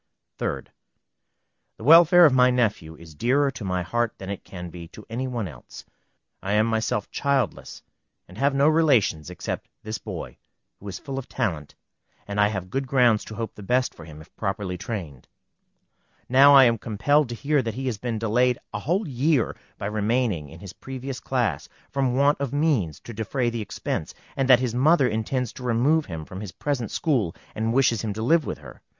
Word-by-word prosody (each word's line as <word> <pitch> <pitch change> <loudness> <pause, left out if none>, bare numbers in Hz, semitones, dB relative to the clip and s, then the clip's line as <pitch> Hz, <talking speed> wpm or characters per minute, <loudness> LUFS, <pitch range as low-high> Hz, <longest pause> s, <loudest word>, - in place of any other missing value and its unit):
3d. - - -2 1.1
The - - -11
welfare 170 +4 +8
of 145 - +5
my 125 -1 +5
nephew 105 -10 0
is 80 -1 -14
dearer 135 - +2
to 120 - -8
my 90 -2 -1
heart 120 +5 -1
than 95 0 -6
it 100 - -6
can 90 -2 -8
be 85 -1 -9
to 105 +5 -13
any 130 +3 -2
one 120 -5 -3
else. 65 -7 -12 0.6
I 95 +3 -2
am 105 +1 +4
myself 110 -2 -1
childless, 140 -6 -1 0.4
and 90 - -14
have 140 +5 +1
no 140 +2 +4
relations 135 - +3
except 90 - -5 0.2
this 110 -1 -4
boy, - - -7 0.4
who 100 - -11
is 95 - -5
full 135 -1 -5
of 130 - -10
talent, 80 - -3 0.5
and 100 0 0
I 105 - +5
have 95 -3 -5
good 135 0 -2
grounds 125 -5 +3
to 110 - -8
hope 115 +1 -4
the - - -12
best 125 +5 +1
for 85 - -12
him, 75 -1 -11
if 80 - -18
properly 95 -2 -3
trained. 85 - -6 1.0
Now 140 +3 +7
I 135 - +9
am 115 -3 +3
compelled 125 +7 +1
to 120 - -4
hear 140 +3 +1
that 115 -3 -4
he 135 - -4
has 120 -6 -2
been 120 0 -3
delayed 120 +3 +2 0.2
a 105 - -2
whole 180 - -1
year 135 0 +1 0.2
by - - -6
remaining 105 - 0
in 80 +3 -13
his 100 -2 -9
previous 130 +1 -7
class, - - -1 0.2
from 130 -3 0
want 140 +1 +3
of 140 -3 -2
means 140 - 0
to 120 - -9
defray 120 +3 -1
the 115 -1 -3
expense, 90 -4 -4 0.2
and 135 -1 0
that 125 -1 +7
his 125 -3 -1
mother 140 +2 +4
intends 115 +2 -2
to 130 - -10
remove 130 +7 +2
him 80 -4 -6
from 95 +4 -8
his 100 -3 -7
present 135 -7 -2
school, 120 - 0 0.2
and 110 +1 -1
wishes 120 -4 +2
him 105 -2 -3
to 110 +2 -4
live 160 +5 +3
with - - -3
her. - - -13
115 Hz, 200 wpm, -24 LUFS, 100-135 Hz, 1.1 s, I